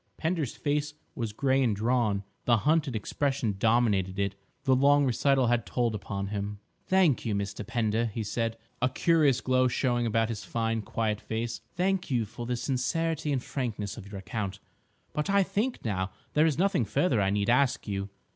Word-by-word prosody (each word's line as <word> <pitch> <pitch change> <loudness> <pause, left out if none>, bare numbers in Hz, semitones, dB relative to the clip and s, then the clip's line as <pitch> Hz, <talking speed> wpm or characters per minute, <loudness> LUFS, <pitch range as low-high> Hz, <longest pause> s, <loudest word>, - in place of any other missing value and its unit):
Pender's 160 -5 -1
face 150 0 -1 0.2
was 115 -4 -3
grey 135 +4 +2
and 115 -5 +2
drawn; 110 -2 +1 0.2
the 120 -1 +5
hunted 145 0 +1
expression 130 +1 -1
dominated 105 -5 +2
it; 100 -1 0 0.3
the 130 -2 +4
long 145 +2 +5
recital 135 +1 +3
had 120 -1 +2
told 120 -2 0
upon 100 -1 -4
him. 105 0 -3 0.3
"Thank 185 -8 +3
you, 110 -3 -1
Mr. 100 +1 -3
Pender," 110 +1 0
he 110 +1 -4
said, 115 +1 -2 0.2
a 130 - +3
curious 145 -2 +3
glow 130 0 +3
showing 120 -1 +1
about 115 0 +1
his 105 -3 -4
fine, 115 +2 -1
quiet 105 0 -2
face; 115 +1 -3
"thank 190 +1 0
you 120 -4 +1
for 120 +3 -7
the 125 - 0
sincerity 145 +5 -1
and 130 -3 0
frankness 110 -7 -3
of 105 -4 -10
your 100 - -6
account. 100 0 -4 0.6
But 150 +3 -2
I 200 0 +4
think 225 - -2
now 95 -3 -1 0.2
there 155 +2 +4
is 155 - 0
nothing 185 - +2
further 120 - +1
I 95 - +2
need 100 0 0
ask 130 -1 +2
you." 100 -1 -3
120 Hz, 180 wpm, -28 LUFS, 105-140 Hz, 0.6 s, the